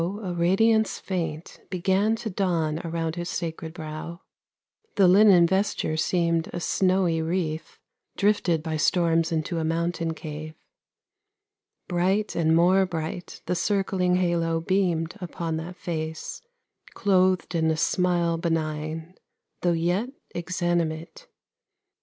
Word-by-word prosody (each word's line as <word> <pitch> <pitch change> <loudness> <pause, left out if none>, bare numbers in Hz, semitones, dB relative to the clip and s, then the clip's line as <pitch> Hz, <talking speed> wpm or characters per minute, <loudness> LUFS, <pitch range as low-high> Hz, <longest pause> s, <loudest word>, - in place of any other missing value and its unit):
a 190 +2 -3
radiance 215 +6 +3
faint 165 -4 -4
Began 190 +4 +1
to 225 0 -5
dawn 170 -5 0
around 165 0 -3
His 175 0 -3
sacred 165 -2 -4
brow; 160 +1 -7 0.7
The 195 -2 +5
linen 190 -2 +7
vesture 190 -3 0
seemed 170 0 +1
a 175 - -4
snowy 185 -1 +1
wreath, 160 -1 -3 0.4
Drifted 195 -6 +2
by 160 -1 -2
storms 165 0 +2
into 165 +1 -1
a - - -1
mountain 165 0 -1
cave; 155 0 -7 1.3
Bright 190 +4 0
and 160 -1 +3
more 185 +3 +4
bright 165 0 -5
the 180 - 0
circling 190 -1 +1
halo 170 -2 +1
beamed 170 -2 0
Upon 170 -2 -3
that 170 +3 -6
face, 160 - -5 0.5
clothed 185 -3 +2
in 160 -1 +2
a 160 - +1
smile 175 -1 +1
benign, 160 0 -2 0.5
Though 175 -1 +2
yet 175 +8 0 0.2
exanimate. 175 - -2
170 Hz, 115 wpm, -25 LUFS, 160-185 Hz, 1.3 s, linen